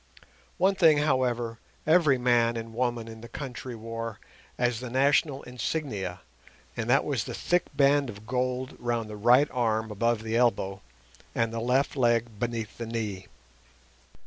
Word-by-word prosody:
One 190 +2 +4
thing, 165 -5 +5
however, 125 -5 0 0.3
every 155 -4 +5
man 120 -1 +2
and 115 0 -6
woman 120 -1 -1
in 110 0 -10
the 120 - -9
country 130 -3 -6
wore 115 0 -6 0.4
as 120 -2 +1
the 125 -1 -6
national 140 +2 +2
insignia, 120 - -3 0.5
and 115 0 -3
that 135 +3 +4
was 130 -8 -1
the - - -5
thick 175 0 +1
band 140 -1 +4
of 105 -1 -9
gold 125 +1 -2
round 120 -3 -2
the - - -6
right 120 +7 +5
arm 110 -3 0
above 115 +1 0
the 110 0 -2
elbow, 105 -5 +1 0.5
and 115 -1 0
the 115 - -2
left 125 +5 +1
leg 120 -4 +1
beneath 115 -2 -3
the 115 - -4
knee. 105 -5 -4
120 Hz, 155 wpm, -28 LUFS, 115-130 Hz, 0.5 s, thing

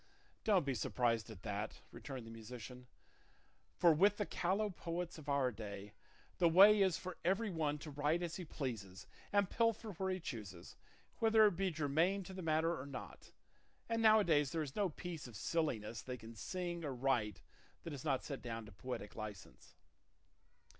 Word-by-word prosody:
"Don't 195 -8 +4
be 135 - 0
surprised 115 0 0
at 100 -4 -10
that," 105 0 -4
returned 130 -4 -7
the 115 - -9
musician; 125 +2 -9 0.9
"for 170 -2 +6
with 200 +6 +4
the 210 - 0
callow 195 +5 0
poets 175 -1 -4
of 150 -1 -8
our 140 -3 +2
day 105 -2 -7 0.5
the 170 -2 +6
way 200 +5 +8
is 190 -3 +3
for 185 -1 -6
every 195 +4 +1
one 155 -3 0
to 150 +1 -8
write 150 +4 +1
as 170 -2 -3
he 185 - -5
pleases 115 - -5 0.3
and 200 -2 +2
pilfer 230 -1 +1
where 190 +1 -2
he 185 0 -1
chooses, 105 - -7 0.4
whether 220 -1 +6
it 205 - +4
be 195 +1 +1
germane 160 +5 +1
to 190 - -9
the 185 - -5
matter 165 +1 +2
or 135 - -8
not, 140 -2 -8 0.6
and 230 0 0
now 220 -1 +8
a - - +4
days 150 -6 +3
there 160 -1 0
is 140 -3 -7
no 200 -3 +2
piece 165 -2 -6
of 120 - -11
silliness 115 -4 -1
they 125 -1 -5
can 115 0 -10
sing 175 - -4
or 140 -4 -3
write 120 -5 0 0.4
that 165 - -5
is 135 - -6
not 135 -4 +1
set 140 -3 -5
down 115 -2 -5
to 105 - -12
poetic 105 0 -6
licence." 105 -3 -8
150 Hz, 185 wpm, -37 LUFS, 120-185 Hz, 0.9 s, way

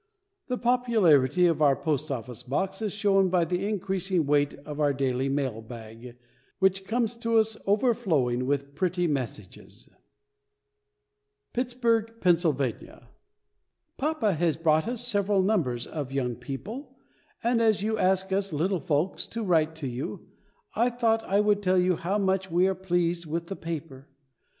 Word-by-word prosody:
The 250 - -2
popularity 200 - +3
of 165 -3 +2
our 140 -2 +5
Post 155 0 -2
office 125 -2 -5
Box 190 - -2
is 215 -2 -1
shown 195 -2 +2
by 175 -2 +2
the 180 +4 -1
increasing 190 -4 -1
weight 145 0 +2
of 150 0 -7
our 145 -2 +2
daily 135 0 -1
mail 135 -5 -2
bag, 115 +1 -11 0.4
which 190 0 +2
comes 230 +1 -1
to 230 -1 +1
us 220 0 +2
overflowing 190 - +1
with 140 0 -1
pretty 180 0 0
messages. 125 - -5 1.6
PITTSBURGH, 230 -2 0
PENNSYLVANIA. 160 - 0 0.9
Papa 275 -8 0
has 165 -1 0
brought 160 +1 +2
us 240 0 -1
several 200 -3 +2
numbers 155 - 0
of 145 -4 -5
Young 125 -3 -1
People, 170 - -8 0.5
and 235 0 +2
as 215 -3 +2
you 220 0 -1
ask 190 +1 +2
us 195 0 0
little 175 +5 0
folks 155 +5 -1
to 230 -1 -4
write 160 -4 +2
to 155 -4 -4
you, 130 +9 -6 0.5
I 235 +3 +2
thought 230 -2 +1
I 200 +2 +2
would 210 -1 +2
tell 185 -1 +2
you 180 0 +3
how 185 +5 -1
much 190 -1 0
we 175 +2 +3
are 190 - +1
pleased 175 -2 -1
with 165 +2 -3
the 195 - -4
paper. 150 -5 -7
180 Hz, 150 wpm, -27 LUFS, 145-210 Hz, 1.6 s, our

